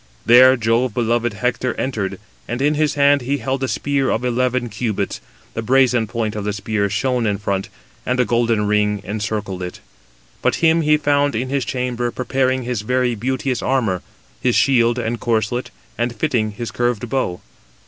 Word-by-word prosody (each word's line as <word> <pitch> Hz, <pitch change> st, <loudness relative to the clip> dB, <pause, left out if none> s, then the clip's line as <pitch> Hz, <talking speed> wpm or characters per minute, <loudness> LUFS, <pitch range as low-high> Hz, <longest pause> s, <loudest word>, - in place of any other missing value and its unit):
There 130 Hz, +2 st, +7 dB
Jove 115 Hz, +1 st, +1 dB
beloved 120 Hz, -1 st, +1 dB
Hector 125 Hz, +3 st, -1 dB
entered, 110 Hz, -8 st, -3 dB, 0.3 s
and 120 Hz, +2 st, -3 dB
in 145 Hz, +2 st, +2 dB
his 150 Hz, -1 st, +1 dB
hand 140 Hz, 0 st, +4 dB
he 135 Hz, +4 st, -1 dB
held 130 Hz, +1 st, -2 dB
a -, -, +1 dB
spear 140 Hz, 0 st, 0 dB
of 115 Hz, +3 st, -1 dB
eleven 125 Hz, 0 st, 0 dB
cubits; 110 Hz, -1 st, -3 dB, 0.3 s
the 115 Hz, -, -3 dB
brazen 125 Hz, -1 st, +3 dB
point 110 Hz, -1 st, -2 dB
of 105 Hz, -, -3 dB
the 105 Hz, 0 st, -2 dB
spear 100 Hz, 0 st, -1 dB
shone 120 Hz, +3 st, 0 dB
in 100 Hz, -1 st, 0 dB
front, 100 Hz, -1 st, -2 dB, 0.3 s
and 125 Hz, 0 st, -1 dB
a 125 Hz, -, +4 dB
golden 115 Hz, -3 st, +1 dB
ring 105 Hz, 0 st, +1 dB
encircled 105 Hz, -2 st, -3 dB
it. 90 Hz, -1 st, -6 dB, 0.6 s
But -, -, +2 dB
him 165 Hz, 0 st, +3 dB
he 150 Hz, -1 st, +4 dB
found 145 Hz, -2 st, +1 dB
in 125 Hz, +4 st, -2 dB
his 135 Hz, -2 st, -1 dB
chamber 125 Hz, -2 st, -2 dB
preparing 130 Hz, +1 st, 0 dB
his 120 Hz, -3 st, -2 dB
very 125 Hz, +2 st, +1 dB
beauteous 130 Hz, +3 st, -2 dB
armour, 115 Hz, -9 st, 0 dB, 0.4 s
his 125 Hz, -2 st, +2 dB
shield 120 Hz, -3 st, +3 dB
and 120 Hz, -1 st, -2 dB
corslet, 115 Hz, +1 st, -1 dB, 0.3 s
and 120 Hz, 0 st, -1 dB
fitting 115 Hz, -8 st, 0 dB
his 115 Hz, +1 st, -5 dB
curved 120 Hz, -1 st, -1 dB
bow. 110 Hz, -8 st, -1 dB
120 Hz, 175 wpm, -20 LUFS, 110-130 Hz, 0.6 s, There